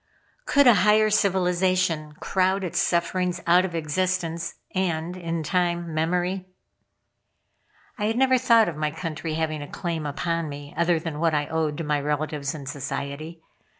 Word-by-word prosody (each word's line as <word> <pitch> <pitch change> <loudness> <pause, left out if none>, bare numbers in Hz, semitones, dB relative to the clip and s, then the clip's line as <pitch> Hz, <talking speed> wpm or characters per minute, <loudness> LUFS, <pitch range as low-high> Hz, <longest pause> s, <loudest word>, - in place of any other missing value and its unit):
Could 285 -1 +5
a 245 - +8
higher 215 +2 +4
civilization 180 -5 +1
crowd 190 +4 0
its 180 - -1
sufferings 180 +1 0
out 180 +2 +5
of 175 -3 -5
existence 170 +1 -1 0.2
and, 175 -2 -1
in 165 -2 -3
time, 175 0 0
memory?" 180 +4 -1 1.5
I 205 - 0
had 225 +2 0
never 260 0 +4
thought 230 -3 +5
of 170 - -3
my 155 0 -1
country 160 0 -4
having 155 -1 -2
a 145 - -6
claim 165 -4 -3
upon 165 +2 -2
me 145 0 -8
other 170 -1 +2
than 160 -2 -5
what 165 -1 +2
I 145 0 +1
owed 155 -2 -1
to 165 - -3
my 150 -1 0
relatives 150 0 -2
and 140 -3 -8
society. 145 +3 -5
170 Hz, 155 wpm, -25 LUFS, 155-185 Hz, 1.5 s, a